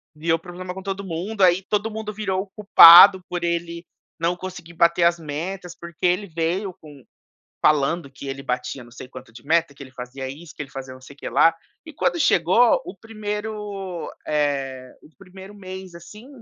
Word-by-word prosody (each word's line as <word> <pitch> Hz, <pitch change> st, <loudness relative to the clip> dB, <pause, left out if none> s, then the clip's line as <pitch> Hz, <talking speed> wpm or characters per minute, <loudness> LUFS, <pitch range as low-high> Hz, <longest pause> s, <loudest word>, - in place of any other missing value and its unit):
Criou 165 Hz, +2 st, 0 dB
problema 180 Hz, +2 st, -8 dB
com 190 Hz, -, -8 dB
todo 195 Hz, 0 st, -5 dB
mundo, 190 Hz, +4 st, -4 dB
aí 185 Hz, +1 st, +4 dB
todo 210 Hz, +3 st, -2 dB
mundo 215 Hz, -1 st, -6 dB
virou 195 Hz, -3 st, -2 dB
o 205 Hz, -, -11 dB
culpado 190 Hz, -2 st, +9 dB
por 175 Hz, -1 st, -4 dB
ele 170 Hz, 0 st, -3 dB, 0.3 s
não 170 Hz, +2 st, 0 dB
conseguir 180 Hz, -2 st, -9 dB
bater 170 Hz, +1 st, +3 dB
as 170 Hz, 0 st, +3 dB
metas. 170 Hz, +4 st, -6 dB
Porque 170 Hz, +1 st, -5 dB
ele 180 Hz, +3 st, +1 dB
veio 175 Hz, +3 st, -3 dB
com 145 Hz, -4 st, -15 dB, 0.6 s
falando 150 Hz, 0 st, +1 dB
que 135 Hz, +1 st, -10 dB
"ele 135 Hz, 0 st, -6 dB
batia 125 Hz, 0 st, -4 dB
não 120 Hz, -, -17 dB
sei 125 Hz, +1 st, -11 dB
quanto 130 Hz, -2 st, -13 dB
de 120 Hz, +3 st, -14 dB
meta, 165 Hz, -1 st, +1 dB
que 140 Hz, -, -16 dB
ele 130 Hz, -, -14 dB
fazia 130 Hz, +1 st, -8 dB
isso, 150 Hz, +4 st, -11 dB
que -, -, -6 dB
ele 135 Hz, -, -8 dB
fazia 135 Hz, -1 st, -8 dB
não 130 Hz, -, -15 dB
sei 140 Hz, +2 st, -14 dB
o -, -, -37 dB
que -, -, -6 dB
lá", 165 Hz, 0 st, +4 dB, 0.3 s
e 320 Hz, -, -10 dB
quando 340 Hz, -, -1 dB
chegou 225 Hz, -, +4 dB
o 195 Hz, -, -8 dB
primeiro, 210 Hz, -3 st, -6 dB, 0.2 s
eh, 135 Hz, -4 st, -2 dB
o -, -, -18 dB
primeiro 190 Hz, +2 st, -13 dB
mês, 185 Hz, -2 st, -10 dB
assim, 210 Hz, +8 st, -13 dB
170 Hz, 195 wpm, -22 LUFS, 145-190 Hz, 0.6 s, culpado